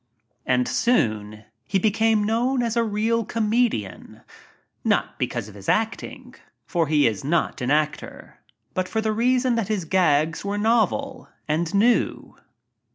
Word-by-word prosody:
And 125 -1 +2
soon 110 - 0 0.2
he 195 - +1
became 220 +2 +2
known 240 +4 +1
as 230 -1 -1
a 235 - +2
real 225 +2 0
comedian 220 - -1 0.3
— - - -41
aot - - +2
because - - -2
of 105 - -12
his 100 -1 -7
acting, 225 0 -2 0.3
for 170 -4 0
he 150 -1 +3
is 110 -4 0
not 155 -1 -1
an 125 - -1
actor 150 +1 -2 0.2
— - - -47
but 185 0 -2
for 220 - -1
the 220 0 0
reason 250 +2 +2
that 230 -4 -1
his 205 -5 -2
"gags" 160 -3 +1
were 200 +1 -2
novel 240 +5 0 0.2
and 160 +2 -1
new. 235 +4 +1
205 Hz, 155 wpm, -23 LUFS, 150-230 Hz, 0.3 s, he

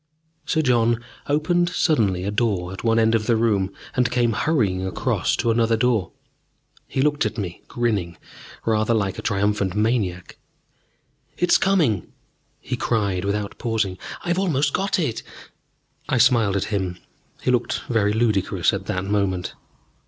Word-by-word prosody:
Sir 160 -1 +1
John 120 -2 +2 0.2
opened 170 +4 +2
suddenly 110 - +1
a 100 - -2
door 100 -5 0
at 95 - -8
one 115 -1 +2
end 115 0 +3
of 110 -1 0
the 115 - +4
room 105 -4 +1 0.2
and 125 -1 +2
came 120 -2 +1
hurrying 105 - +1
across 95 - 0
to 115 - +1
another 115 0 +2
door. 115 -6 +1 0.8
He 130 - 0
looked 145 0 +2
at 110 +1 -2
me, 90 -5 -5
grinning 100 -8 -1 0.5
rather 110 +1 +2
like 100 -4 -1
a - - -3
triumphant 100 -2 0
maniac. 105 -5 -1 1.0
"It's 180 - +3
coming!" 155 - +2 0.5
he - - -4
cried, 100 -6 0
without 100 0 -3
pausing, 110 -5 -1 0.3
"I've 175 +1 +1
almost 145 -7 +1
got 195 +1 0
it!" 145 -11 -1 0.9
I - - +2
smiled 115 -5 +4
at 100 - +1
him: 95 -3 -1 0.5
he - - +2
looked 125 -1 0
very 110 -4 +2
ludicrous 110 -3 +1
at - - -4
that 95 0 -2
moment. 100 -3 -1
110 Hz, 150 wpm, -23 LUFS, 100-125 Hz, 1.0 s, the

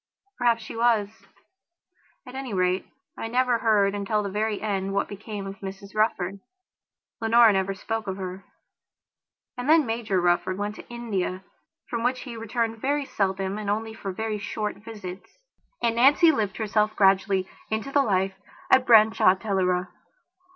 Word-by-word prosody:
Perhaps 235 -2 +2
she 220 - -8
was. 225 -3 +2 1.2
At 250 - -11
any 265 -5 -5
rate, 185 0 +1 0.3
I - - -5
never 245 0 +2
heard 205 -3 +3
until 205 +1 -1
the 200 - -4
very 210 +1 -1
end 195 -2 -2
what 200 - +1
became 205 0 -7
of 195 0 -8
Mrs 195 +1 -8
Rufford. 200 -3 0 0.8
Leonora 225 -1 +6
never 195 0 0
spoke 225 +2 -4
of 190 0 -3
her. 190 0 -6 1.2
And 250 +4 -3
then 315 -2 +6
Major 225 -4 -1
Rufford 175 +1 +1
went 205 +1 -3
to - - -12
India, 200 -6 -3 0.4
from 235 - -3
which 250 +1 0
he 245 -3 -8
returned 225 0 -2
very 285 +1 0
seldom 195 -2 -1
and 210 -1 -4
only 220 +2 -2
for 200 -3 -5
very 215 +2 -3
short 210 0 -4
visits; 205 - -10 0.5
and 230 -1 +1
Nancy 290 +7 +6
lived 210 -9 -2
herself 215 0 0
gradually 195 -1 +3 0.2
into 220 +5 -2
the 285 - +4
life 195 -5 +1 0.4
at 260 0 +5
Branshaw 220 -4 +6
Teleragh. 185 -3 0
210 Hz, 155 wpm, -25 LUFS, 195-230 Hz, 1.2 s, Leonora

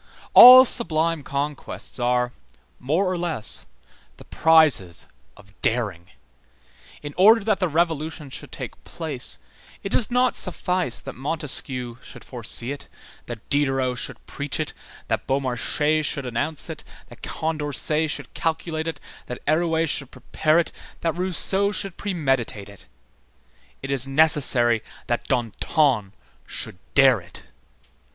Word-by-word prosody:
All 255 +1 +11
sublime 165 - +1
conquests 140 0 -4
are, 125 0 +1 0.5
more 160 +9 0
or 185 -1 -2
less, 165 -11 -4 0.5
the - - -15
prizes 155 - +3 0.3
of 100 -1 -18
daring. 100 -7 -2 0.9
In 145 0 -7
order 215 +4 +6
that 215 -1 0
the 185 - +1
Revolution 160 -3 -2
should - - -9
take - - -8
place, - - -5 0.5
it 195 - -4
does 215 +1 +1
not 250 0 +2
suffice 180 -9 0
that - - -8
Montesquieu 130 -4 -3
should - - -13
foresee 120 0 -3
it, 145 - -7 0.4
that 120 -3 -9
Diderot 135 -3 0
should - - -6
preach 140 -2 -5
it, 155 - -3 0.3
that - - -2
Beaumarchais 140 +3 0
should 140 -2 -1
announce 140 +6 -3
it, - - -8 0.3
that - - -15
Condorcet 155 0 0
should - - -5
calculate 160 0 -3
it, 160 -3 -4 0.3
that 125 - -5
Arouet 165 +1 +1
should 140 -2 -1
prepare 155 +5 0
it, 170 - +1 0.3
that 165 -1 0
Rousseau 190 +2 0
should 195 -3 -2
premeditate 135 - -2
it; 100 - -15 1.0
it 135 - -4
is 135 -1 +3
necessary 135 -6 +5 0.2
that 120 - -2
Danton 120 - 0 0.3
should 90 - -6 0.2
dare 130 -6 +5
it. 90 - -10
145 Hz, 130 wpm, -23 LUFS, 125-165 Hz, 1.0 s, All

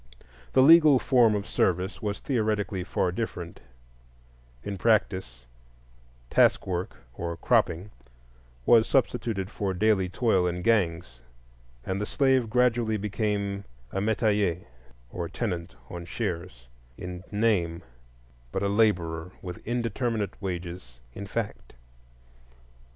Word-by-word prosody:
The 130 - +6
legal 155 -2 +8
form 120 -4 +4
of 100 -1 -2
service 90 -1 0
was 105 -1 -3
theoretically 105 -6 -1
far 90 0 0
different; 90 -4 -5 1.0
in 100 -2 -5
practice, 95 - +1 0.9
task - - +4
work 90 -1 -3 0.2
or 85 +5 -4
"cropping" 90 +5 +1 0.7
was 115 -2 +6
substituted 115 -6 0
for 100 -4 -2
daily 95 -1 +2
toil 95 -3 +2
in 90 0 -3
gangs; 85 - +1 0.7
and 95 +2 -2
the 105 - -2
slave 130 -4 +2
gradually 120 -2 +2
became 100 -1 -2 0.3
a 95 - -2
metayer, 105 -4 +1 0.5
or 85 -2 -4
tenant 90 - -4
on 85 -1 -7
shares, 85 - -4 0.3
in 90 0 -7
name, 95 -6 +1 0.7
but 95 - -2
a 100 - +1
laborer 90 -6 +1
with 90 -2 -6
indeterminate 115 -2 -1
wages 85 -8 -6 0.2
in 100 +6 -7
fact. 105 - -5
100 Hz, 110 wpm, -27 LUFS, 90-110 Hz, 1.0 s, legal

